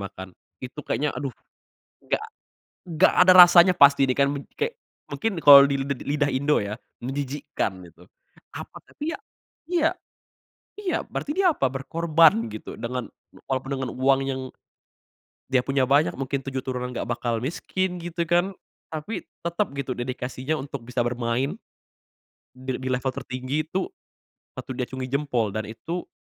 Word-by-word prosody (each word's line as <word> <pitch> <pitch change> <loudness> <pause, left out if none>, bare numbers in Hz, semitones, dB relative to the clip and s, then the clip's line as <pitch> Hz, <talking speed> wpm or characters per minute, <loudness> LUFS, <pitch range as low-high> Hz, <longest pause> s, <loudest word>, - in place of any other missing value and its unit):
makan. 95 +1 -10 0.3
Itu 130 +3 -8
kayaknya, 150 0 -1
aduh, 140 - -3 0.8
nggak - - 0 0.6
nggak 170 +2 +3
ada - - +10
rasanya 175 0 +9
pasti 140 -3 +6
ini 130 - +1
kan, 140 0 +3 0.2
kek 470 +1 -3 0.3
mungkin 200 -7 -2
kalau 140 -1 +10
di 140 - 0
lid 140 - -4 0.2
lidah 145 0 +1
Indo 140 -1 +1
ya 105 +3 -5 0.2
menjijikkan, 135 -7 -3
gitu. 90 +2 -20 0.5
Apa - - -8
tapi 305 +2 -6
ya, 330 - -6 0.5
iya, 335 -2 +2 0.8
iya 400 -3 -2
berarti - - -5
dia 360 +1 +3
apa? 135 - 0
Berkorban 150 -2 +3
gitu, 110 0 -8
dengan 120 0 -4 0.4
walaupun 135 0 -2
dengan 130 -1 -3
uang 135 +1 +3
yang 135 -1 -2 1.1
dia 130 -2 +2
punya 135 -2 +1
banyak 145 +3 +4
mungkin 135 0 -3
7 135 -1 -3
turunan 125 -1 -4
nggak 120 - -4
bakal 120 -1 -1
miskin, 180 +6 -2
gitu 175 0 -4
kan. 175 +3 +2 0.4
Tapi 160 +8 -5 0.2
tetep 170 +4 -1
gitu, 135 -3 -4
dedikasinya 130 +3 -3
untuk 140 -3 -7
bisa 125 +1 -1
bermain 120 +2 -1 1.0
dil 130 0 -4
di 130 - -7
level 130 +1 0
tertinggi 130 +4 -4
tuh 190 - -3 0.7
patut - - -7
diacungi 130 +1 -4
jempol 135 -7 0
dan 110 +2 -4
itu 165 +11 -6
135 Hz, 145 wpm, -25 LUFS, 125-165 Hz, 1.1 s, ada